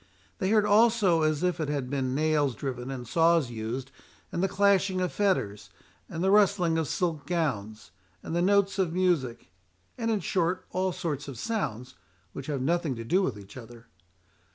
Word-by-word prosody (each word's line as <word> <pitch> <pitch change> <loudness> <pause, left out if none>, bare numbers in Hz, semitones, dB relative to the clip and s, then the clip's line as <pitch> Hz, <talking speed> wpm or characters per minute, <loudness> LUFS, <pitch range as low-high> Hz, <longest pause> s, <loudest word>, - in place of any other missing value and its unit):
They 190 -3 0
heard 210 -1 +4
also 210 -5 +4
as 155 +1 +1
if 180 -1 0
it 155 -2 -2
had 140 -3 -2
been 130 -1 -2
nails 150 -3 +1
driven 125 0 -5
and 125 -3 -6
saws 165 -3 +3
used, 120 +4 -5 0.4
and 170 - -2
the 195 - +2
clashing 195 -1 +2
of 180 -1 -1
fetters, 105 - 0 0.4
and 165 +1 -4
the 190 - +3
rustling 195 -5 +3
of 160 - -1
silk 160 -5 -2
gowns, 110 - -2 0.3
and 165 - -4
the 170 - +2
notes 200 +1 +2
of 175 -4 +1
music, 160 - 0 0.5
and 230 -1 -1
in 220 -2 +1
short 180 0 -1
all 185 0 0
sorts 145 -5 -4
of 135 -4 -7
sounds 130 - -3 0.4
which 135 - -7
have 140 -4 -2
nothing 165 -2 0
to 115 - -6
do 180 +12 +2
with 130 - -1
each 100 -1 -13
other. 120 -2 -11
160 Hz, 180 wpm, -28 LUFS, 130-185 Hz, 0.5 s, heard